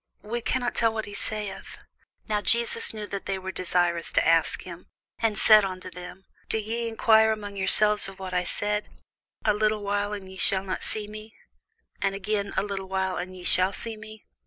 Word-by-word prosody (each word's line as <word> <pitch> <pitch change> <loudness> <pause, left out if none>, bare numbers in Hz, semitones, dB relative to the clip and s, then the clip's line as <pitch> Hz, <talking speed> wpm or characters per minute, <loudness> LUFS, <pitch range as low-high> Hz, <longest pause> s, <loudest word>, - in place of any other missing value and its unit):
we 235 +3 -3
cannot 245 +1 -1
tell 230 -1 +3
what 220 -1 -4
he 205 - -9
saith. 210 -2 -3 0.5
Now 210 -2 0
Jesus 235 +4 +1
knew 215 -1 -6
that 200 -1 -6
they 195 - -1
were 190 0 -6
desirous 175 -2 0
to - - +2
ask 165 -1 +3
him, 175 -1 -10 0.3
and 220 -3 +1
said 215 -1 +7
unto 185 -1 -5
them, 180 +1 -10 0.2
Do - - +1
ye 230 +2 -3
enquire 220 -1 +4
among 205 -2 -5
yourselves 210 +2 +5
of 195 - -12
that 190 -1 -7
I 180 0 +1
said, 210 +3 -2 0.6
A 210 - +4
little 215 0 0
while, 205 +1 -1
and 200 -2 -6
ye 190 0 -11
shall 190 0 +3
not 185 -1 -4
see 210 -1 -1
me: 215 +1 -11 0.7
and 195 0 0
again, 200 0 -2
a - - +2
little 195 -2 -5
while, 190 -1 -1
and 185 +1 -6
ye 180 - -10
shall 185 +2 +3
see 225 +2 -5
me? 215 0 -12
205 Hz, 200 wpm, -26 LUFS, 190-215 Hz, 0.7 s, said